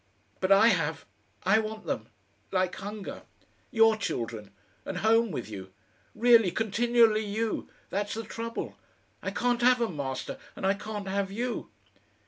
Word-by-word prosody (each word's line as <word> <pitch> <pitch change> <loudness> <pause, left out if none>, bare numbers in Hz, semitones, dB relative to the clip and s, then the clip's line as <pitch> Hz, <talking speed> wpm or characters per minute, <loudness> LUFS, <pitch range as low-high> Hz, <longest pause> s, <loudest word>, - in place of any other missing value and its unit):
But 190 +1 0
I 205 +4 +8
have.... 160 -6 0 0.4
I 195 +4 +5
want 215 0 -5
them 110 - -3 0.4
like 185 -1 +1
hunger. 205 +1 -6 0.5
YOUR 225 -2 +5
children, 115 - -3 0.3
and - - -4
home 225 +1 +4
with 135 -9 -4
you. 95 -3 -8 0.4
Really, 230 -3 +6
continually 220 +2 +3
you! 215 +2 -2 0.2
That's 205 +2 -1
the 225 - -3
trouble.... 230 +1 -5 0.4
I - - -2
can't 245 0 0
have 250 +1 +5
'em, 225 -10 -1
Master, 135 -2 -4 0.2
and - - -4
I 195 - +4
can't 205 0 -6
have 195 0 -1
you." 240 +4 -3
210 Hz, 145 wpm, -29 LUFS, 185-225 Hz, 0.5 s, I